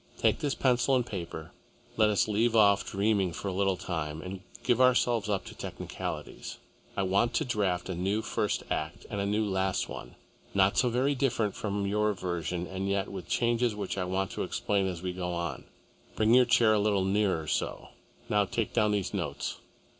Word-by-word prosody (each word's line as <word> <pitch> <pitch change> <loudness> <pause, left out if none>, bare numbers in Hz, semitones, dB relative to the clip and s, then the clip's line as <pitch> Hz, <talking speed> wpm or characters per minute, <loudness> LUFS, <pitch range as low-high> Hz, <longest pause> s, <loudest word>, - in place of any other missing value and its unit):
Take - - +2
this 145 -2 -1
pencil 125 0 +3
and 125 -2 +2
paper. 85 -7 -6 0.4
Let 110 -1 +4
us 105 0 +2
leave 110 +2 +2
off 100 -2 +5
dreaming 100 -3 +1
for 100 - -4
a - - -3
little 95 0 +1
time 80 -4 -3
and 95 +1 -6 0.2
give 125 0 +3
ourselves 120 -4 +3
up 100 -2 0
to - - -9
technicalities. - - -6 0.4
I 100 - +2
want 100 +6 +2
to - - +1
draft 100 -7 0
a 95 - -2
new 95 +5 -1
first - - -1
act 80 +2 -3
and 100 -2 -1
a 100 - -1
new 105 +2 +1
last 95 -1 0
one, - - -8 0.4
not 95 0 +4
so 125 0 +3
very 130 +4 +2
different 120 -6 0
from 100 -1 -2
your 105 +1 +1
version 90 -2 -3
and 95 +1 -3
yet 100 -1 0
with 95 -2 -7
changes 120 -1 +1
which 100 -2 -3
I 95 -2 -1
want 95 +1 -1
to - - -4
explain 100 -2 0
as 90 -2 -5
we 90 -1 -2
go 90 -1 -3
on. 85 -1 -4 0.5
Bring 110 +1 +3
your 125 0 +7
chair 120 -2 +5
a 105 - +3
little 100 -2 +2
nearer 95 -5 +1
so. - - -2 0.4
Now 105 -3 +3
take 115 +3 -2
down 105 -3 +3
these 100 -3 -1
notes." - - -3
100 Hz, 195 wpm, -29 LUFS, 95-110 Hz, 0.5 s, your